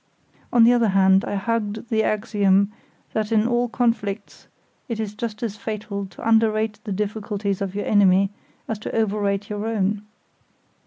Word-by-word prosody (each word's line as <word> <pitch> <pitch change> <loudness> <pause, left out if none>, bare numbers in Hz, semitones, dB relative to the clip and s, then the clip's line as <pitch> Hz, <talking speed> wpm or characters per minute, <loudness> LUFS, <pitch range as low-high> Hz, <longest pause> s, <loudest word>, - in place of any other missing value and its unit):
On 240 -2 +6
the 235 +2 +7
other 235 -2 +3
hand 190 -1 +4
I - - -3
hugged 220 +1 -2
the 220 -2 +2
axiom 200 -2 +2 0.4
that 215 0 -1
in 220 0 +3
all 240 0 +1
conflicts 220 -4 -2 0.4
it 230 -2 -3
is 210 -2 -3
just 220 0 -5
as 215 -3 -3
fatal 205 -2 -4
to 190 - -8
underrate 220 -1 +2
the 210 - -4
difficulties 205 0 -2
of 195 -1 -3
your 205 - -2
enemy 195 -1 +4 0.4
as 220 -2 -3
to - - -5
overrate 205 -2 0
your 210 +1 -3
own. 210 -2 0
210 Hz, 160 wpm, -23 LUFS, 200-225 Hz, 0.4 s, the